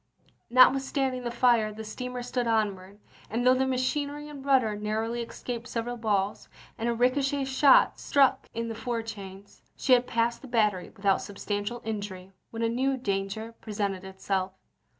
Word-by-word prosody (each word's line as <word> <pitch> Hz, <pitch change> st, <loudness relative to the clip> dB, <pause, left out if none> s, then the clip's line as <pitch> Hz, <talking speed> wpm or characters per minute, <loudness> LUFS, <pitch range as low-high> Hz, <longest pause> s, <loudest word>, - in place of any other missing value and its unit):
Notwithstanding 265 Hz, +1 st, +4 dB
the -, -, 0 dB
fire 235 Hz, -3 st, +3 dB
the 220 Hz, +1 st, -8 dB
steamer 250 Hz, +3 st, -5 dB
stood 245 Hz, -1 st, -2 dB
on 220 Hz, -3 st, +2 dB
ward, 190 Hz, +2 st, -14 dB, 0.3 s
and 235 Hz, +3 st, -1 dB
though 255 Hz, -, +7 dB
the 260 Hz, +1 st, +1 dB
machinery 285 Hz, +3 st, -1 dB
and 285 Hz, -2 st, -9 dB
rudder 255 Hz, -6 st, +3 dB
narrowly 220 Hz, +3 st, -2 dB
escaped 235 Hz, +1 st, -6 dB
several 240 Hz, +1 st, -3 dB
balls, 205 Hz, -3 st, -1 dB, 0.3 s
and 230 Hz, +1 st, -2 dB
a -, -, +1 dB
ricochet 270 Hz, +3 st, +1 dB
shot 270 Hz, +1 st, +5 dB
struck 270 Hz, -2 st, +3 dB
in 230 Hz, 0 st, -3 dB
the 225 Hz, -, -4 dB
fore 230 Hz, +1 st, -3 dB
chains, 200 Hz, -3 st, -10 dB, 0.2 s
she 260 Hz, -, +3 dB
had 245 Hz, 0 st, +4 dB
passed 235 Hz, 0 st, 0 dB
the 270 Hz, -, -10 dB
battery 210 Hz, -6 st, +1 dB
without 195 Hz, -2 st, +1 dB
substantial 205 Hz, +3 st, -4 dB
injury 200 Hz, -4 st, -5 dB, 0.2 s
when 230 Hz, 0 st, -4 dB
a -, -, +3 dB
new 260 Hz, +3 st, 0 dB
danger 200 Hz, 0 st, -3 dB
presented 200 Hz, -3 st, -3 dB
itself. 190 Hz, 0 st, -2 dB
230 Hz, 165 wpm, -28 LUFS, 205-255 Hz, 0.3 s, though